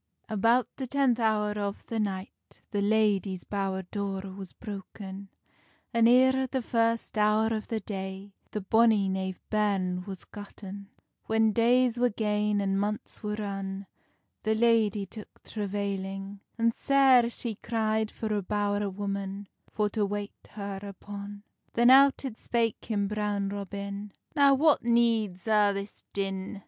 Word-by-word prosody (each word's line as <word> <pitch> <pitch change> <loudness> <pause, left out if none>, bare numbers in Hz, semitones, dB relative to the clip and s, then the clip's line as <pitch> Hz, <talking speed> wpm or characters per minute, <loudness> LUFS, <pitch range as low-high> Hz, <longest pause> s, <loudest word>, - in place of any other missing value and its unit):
About 230 +3 +3
the 265 - -4
tenth 260 -2 +2
hour 215 -2 +2
of 205 -1 -4
the 230 - -3
night, 195 -2 -2 0.4
The 205 - 0
ladie's 200 -3 +2
bowr 195 -2 -2
door 195 -2 -3
was 195 -2 -8
broken, 200 -2 -8 0.6
An 230 -1 +5
eer 260 +2 +5
the 260 0 -2
first 230 -1 0
hour 215 +1 +3
of 215 -1 -3
the 225 -2 -2
day 190 0 -6 0.2
The 210 - -4
bonny 220 0 +4
knave 190 -1 -2
bairn 195 -4 +1
was 195 -2 -8
gotten. 200 -1 -9 0.4
When 220 0 +3
days 240 +2 +3
were 245 0 +4
gane 210 -1 0
and 195 0 0
months 210 +1 -3
were 210 -1 -2
run, 195 -2 -4 0.6
The 220 0 +1
ladye 220 -3 +3
took 210 +2 -12
travailing, 195 -1 -4 0.2
And 230 0 +2
sair 265 -3 +5
she 235 -1 -3
cry'd 220 0 -1
for 220 -1 -3
a 205 - 0
bow'r 205 +1 0
woman, 200 0 -4 0.2
For 210 -1 0
to 215 -1 0
wait 205 0 -3 0.2
her 200 -2 -5
upon. 200 0 -8 0.3
Then 240 +2 +5
out 275 +1 +6
it 235 -4 -5
spake 230 -2 -1
him, 205 -3 0
Brown 205 -1 -1
Robin: 200 0 -5 0.2
"Now 280 -1 +6
what 300 +2 +4
needs 230 -6 +2
a' 210 -2 +4
this 200 +1 -7
din? 195 0 -3
210 Hz, 145 wpm, -28 LUFS, 200-225 Hz, 0.6 s, out